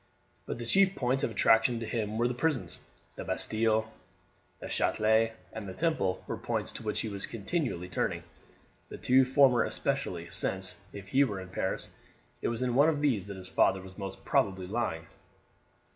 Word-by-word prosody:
But - - -3
the 120 - -5
chief 195 +8 +4
points 130 +1 0
of - - +2
attraction 115 +2 +4
to 115 - -4
him 110 -1 -2
were 120 +1 +3
the 125 - -1
prisons. 135 +1 -1 0.4
The - - -4
Bastille, 110 0 +1 0.7
the - - -7
Chatelet, 110 +1 +2 0.2
and 110 -2 -6
the 95 - -7
Temple 155 - 0
were - - -4
points - - -2
to - - -8
which 105 -1 -1
he - - -3
was 100 -2 -4
continually 115 - -2
turning; 90 - -2 0.7
the - - -7
two 130 +1 +4
former 130 -2 +5
especially, - - -2
since, 95 0 -2
if 100 -1 -9
he 135 +5 +5
were 105 -8 -2
in 95 -1 -8
Paris, 95 +1 -3 0.5
it - - 0
was 115 +1 -1
in 125 -1 0
one 140 +5 +5
of 150 -3 0
these 115 -10 +1
that 100 -1 -7
his 90 -1 -6
father 95 +1 +3
was 95 0 -12
most 95 -2 -7
probably 95 -2 +1
lying. 90 -5 -2
110 Hz, 185 wpm, -30 LUFS, 95-125 Hz, 0.7 s, former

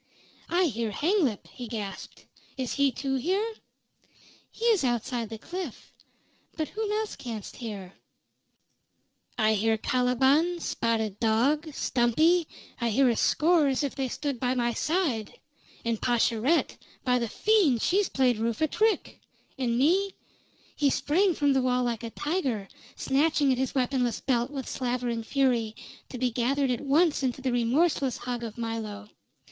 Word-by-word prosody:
"I 355 +2 +3
hear 230 -6 -1
Hanglip!" 300 - 0
he 245 - -9
gasped. 210 -4 -7 0.3
"Is 255 -2 -2
he, 280 -1 +2
too, 270 +2 -2
here?" 380 - 0 1.0
"He 460 - -6
is 445 -9 +4
outside 240 -2 -1
the 225 - -6
cliff. 350 - -7 0.6
But 310 -2 -2
whom 430 -1 -3
else 430 0 -2
canst 225 -4 -7
hear?" 200 -6 -7 1.4
"I 220 0 +3
hear 220 +1 +2
Caliban 265 +9 +2
Spotted 220 - -1
Dog 270 +8 +2
Stumpy 310 +8 +2 0.3
I 235 -1 0
hear 260 +4 +4
a 235 - +1
score 320 +3 +3
as 270 +2 0
if 280 - -2
they 270 -2 -2
stood 280 0 -3
by 250 +1 0
my 240 -1 0
side! 305 - -1 0.5
And 230 -2 -1
Pascherette! 240 +5 +1 0.3
By 250 -1 +2
the 235 -2 -2
fiend! 370 - +3
She 370 - +2
has 405 -2 +2
played 250 -4 +2
Rufe 230 +2 -1
a 315 - +4
trick! 435 +7 0 0.4
And 235 -2 0
me 370 +9 +2 0.3
" - - -32
He 285 - +5
sprang 350 +7 +2
from 285 -1 +2
the 265 - +2
wall 250 0 +1
like 235 -3 -2
a 230 - -5
tiger, 265 - -2 0.3
snatching 285 0 +2
at 255 - 0
his 265 +2 -1
weaponless 250 -3 0
belt 245 -1 0
with 275 -2 -6
slavering 245 -2 -2
fury, 235 -3 +1 0.3
to 255 - -6
be 250 0 0
gathered 260 +3 +1
at 245 - -2
once 295 +3 +2
into 260 -1 -1
the 260 - 0
remorseless 260 +3 +1
hug 245 -1 -4
of 225 -1 -6
Milo. 220 -3 -4
255 Hz, 155 wpm, -27 LUFS, 235-300 Hz, 1.4 s, He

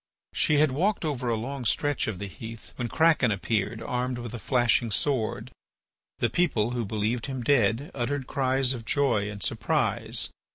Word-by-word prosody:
She 150 - +3
had 150 -1 +4
walked 180 +7 0
over 130 -5 -1
a 115 - +2
long 130 +4 -4
stretch 145 +4 +1
of 110 -5 -3
the 100 - -5
heath 110 +4 -10
when 120 - -3
Kraken 160 -2 +3
appeared 110 +2 -1
armed 125 0 -2
with 120 -1 -6
a 120 - -5
flashing 120 -1 +2
sword. 115 0 -1 0.7
The 120 - +2
people, 120 -5 +1
who 120 -2 -2
believed 110 +4 -1
him 130 -3 -4
dead, 120 - +2
uttered 135 +2 -2
cries 130 -1 +1
of 120 -3 -6
joy 115 -5 +1
and 100 -2 -4
surprise. - - 0
120 Hz, 170 wpm, -27 LUFS, 110-140 Hz, 0.7 s, had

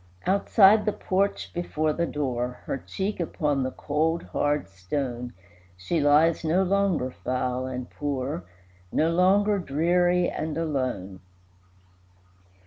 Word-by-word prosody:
Outside 200 +2 +5
the 210 - +2
porch 195 +2 -1
before 155 -3 -1
the 170 +1 -1
door, 125 -4 -3
Her 135 - -3
cheek 195 +8 -4
upon 150 -4 -1
the 130 - 0
cold, 160 +5 -1
hard 145 0 -1
stone, 120 +6 -4 0.5
She 95 - -1
lies, 150 +4 +4
no 170 +4 +2
longer 190 -8 +1
foul 125 0 -2
and 125 -1 -5
poor, 140 -6 -3 0.5
No 160 +2 +2
longer 200 +4 +3
dreary 175 +3 +2
and 155 0 -3
alone. 130 - -2
155 Hz, 120 wpm, -26 LUFS, 130-180 Hz, 0.5 s, Outside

